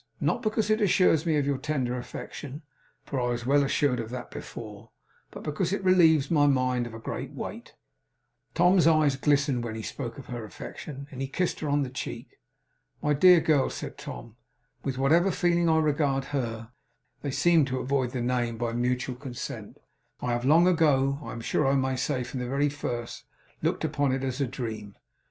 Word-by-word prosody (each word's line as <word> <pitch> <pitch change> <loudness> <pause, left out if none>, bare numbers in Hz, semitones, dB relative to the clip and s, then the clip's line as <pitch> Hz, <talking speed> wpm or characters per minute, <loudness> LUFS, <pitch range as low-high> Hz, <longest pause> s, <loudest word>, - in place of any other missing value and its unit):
Not 235 - 0
because 215 -2 0
it 215 +1 +2
assures 180 -5 +3
me 155 -2 +3
of 145 - +1
your 140 -2 0
tender 130 -5 -1
affection 135 +4 -7 0.4
(for 135 - -3
I - - 0
was 120 -1 -3
well 140 +2 +4
assured 140 -2 +1
of 115 -1 -4
that 125 0 -7
before), 110 -1 -9 0.4
but - - -10
because 160 +4 -1
it 200 0 -2
relieves 165 -6 +5
my 145 -3 +4
mind 130 -3 +1
of 115 - -9
a - - -7
great - - -5
weight.' - - -7 0.8
Tom's 180 0 +5
eyes 155 -4 +4
glistened 140 -3 +1
when 115 -2 -4
he 110 - -5
spoke 120 -2 -5
of 135 - -9
her 120 -2 -6
affection; 135 - -8
and 135 -1 -7
he 135 - -1
kissed 180 +6 -1
her 155 - -3
on 145 0 +2
the 130 - -4
cheek. 120 0 -7 0.6
'My 150 - +3
dear 180 +4 +7
girl,' 150 -4 +3
said - - -7
Tom; - - -9 0.5
'with 130 -2 -3
whatever 160 +8 +4
feeling 175 -2 +2
I 160 - +4
regard 145 -3 +1
her' 115 -4 -3 0.5
they 145 - -3
seemed 165 +1 +3
to 130 -1 -2
avoid 130 -1 0
the 125 0 -3
name 120 -1 -1
by 115 0 -2
mutual 125 +1 -1
consent 125 -1 -7 0.4
'I 125 - -2
have 120 +1 -1
long 165 +5 +6
ago 140 -6 +3
I - - -6
am 115 - -6
sure 135 +5 +1
I 135 - +3
may 130 -1 +1
say 130 0 -1
from 125 +2 -6
the 125 - -3
very 140 +2 +1
first 120 -4 -5 0.4
looked - - 0
upon 145 -3 +1
it 135 0 -2
as 130 +1 -2
a 135 - +1
dream. 110 -5 -6
135 Hz, 195 wpm, -27 LUFS, 125-155 Hz, 0.8 s, dear